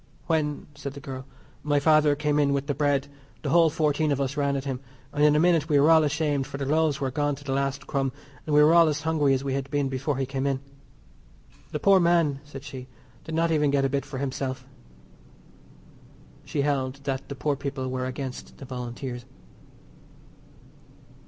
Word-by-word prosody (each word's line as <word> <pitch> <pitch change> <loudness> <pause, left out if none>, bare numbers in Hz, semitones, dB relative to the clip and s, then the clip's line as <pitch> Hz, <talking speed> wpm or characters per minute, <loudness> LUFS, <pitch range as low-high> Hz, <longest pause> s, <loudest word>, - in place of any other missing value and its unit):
"When," 150 -3 -1
said 140 -1 -7
the - - -7
girl, 135 -1 -7 0.3
"my 145 -1 +1
father 155 0 +4
came 150 0 0
in 140 -1 +3
with 140 0 -1
the 145 - -1
bread 145 -1 +1 0.4
the - - -1
whole 170 -1 +5
fourteen 155 -1 +1
of 140 - 0
us 135 0 -1
ran 140 -1 +1
at 135 - -2
him, 135 -2 -3 0.3
and 145 0 +1
in 150 0 +5
a - - +4
minute 165 -2 +3
we 145 -2 +4
were 150 +3 +5
all 160 -1 +6
ashamed 150 -2 0
for 140 - -6
the 140 - -3
loaves 155 0 +1
were 135 -2 -1
gone 145 +1 0
to 145 - -13
the 140 - -4
last 140 0 -1
crumb, 135 -2 -1 0.4
and 150 - +1
we 150 - +7
were 155 +2 +6
all 170 -1 +7
as 155 0 -1
hungry 150 -4 +2
as 130 - -3
we 135 -1 -2
had 135 0 -3
been 145 -1 0
before 135 +2 -2
he 135 - 0
came 135 +1 -2
in. 135 -1 0 1.1
The 150 - -2
poor 195 +4 +5
man," 170 -5 +2
said 135 -2 -10
she, 130 -3 -8 0.4
"did 160 - -4
not 165 0 +2
even 150 -2 +2
get 140 -1 +2
a - - +1
bit 140 +1 -1
for 135 - -7
himself." 130 -1 -3 1.8
She 140 - -1
held 135 -2 0
that 135 -1 -3
the 140 - -5
poor 140 +2 0
people 135 -1 -4
were 130 0 -2
against 130 0 -6
the 135 - -9
Volunteers. 125 0 -6
140 Hz, 205 wpm, -26 LUFS, 135-150 Hz, 1.8 s, we